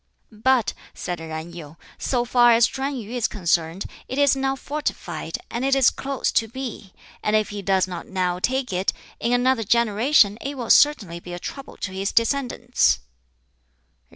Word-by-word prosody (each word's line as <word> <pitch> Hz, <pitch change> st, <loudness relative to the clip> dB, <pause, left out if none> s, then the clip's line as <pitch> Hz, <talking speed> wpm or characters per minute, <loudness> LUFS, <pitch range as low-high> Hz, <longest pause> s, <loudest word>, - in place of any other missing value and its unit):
"But," 235 Hz, +2 st, +2 dB, 0.2 s
said 175 Hz, -1 st, -4 dB
Yen 160 Hz, +1 st, -6 dB
Yu, 160 Hz, -2 st, -10 dB, 0.2 s
"so 245 Hz, -2 st, 0 dB
far 240 Hz, -1 st, +5 dB
as 230 Hz, +1 st, +6 dB
Chuen 275 Hz, +2 st, -3 dB
yu 225 Hz, -2 st, -7 dB
is 245 Hz, -2 st, 0 dB
concerned, 170 Hz, -1 st, -1 dB, 0.2 s
it 260 Hz, -, -5 dB
is 285 Hz, -1 st, +4 dB
now 270 Hz, 0 st, 0 dB
fortified, 295 Hz, +2 st, -4 dB
and 235 Hz, +2 st, -2 dB
it 270 Hz, 0 st, +3 dB
is 265 Hz, -3 st, +5 dB
close 275 Hz, -2 st, -2 dB
to 225 Hz, -, +1 dB
Pi; 235 Hz, -5 st, -6 dB, 0.3 s
and 210 Hz, -, +1 dB
if 215 Hz, -1 st, +2 dB
he 205 Hz, -1 st, -5 dB
does 190 Hz, -1 st, +2 dB
not 180 Hz, -2 st, -7 dB
now 180 Hz, -2 st, -1 dB
take 255 Hz, +1 st, -1 dB
it, 185 Hz, +2 st, 0 dB, 0.3 s
in 235 Hz, -, 0 dB
another 245 Hz, -1 st, +2 dB
generation 225 Hz, 0 st, +3 dB
it 280 Hz, +1 st, -4 dB
will 240 Hz, -3 st, -1 dB
certainly 210 Hz, -, +4 dB
be 175 Hz, +1 st, -9 dB
a 175 Hz, -, -5 dB
trouble 275 Hz, +8 st, -8 dB
to 185 Hz, -, -4 dB
his 195 Hz, +1 st, -2 dB
descendants." 245 Hz, 0 st, +1 dB
230 Hz, 175 wpm, -23 LUFS, 190-260 Hz, 0.3 s, as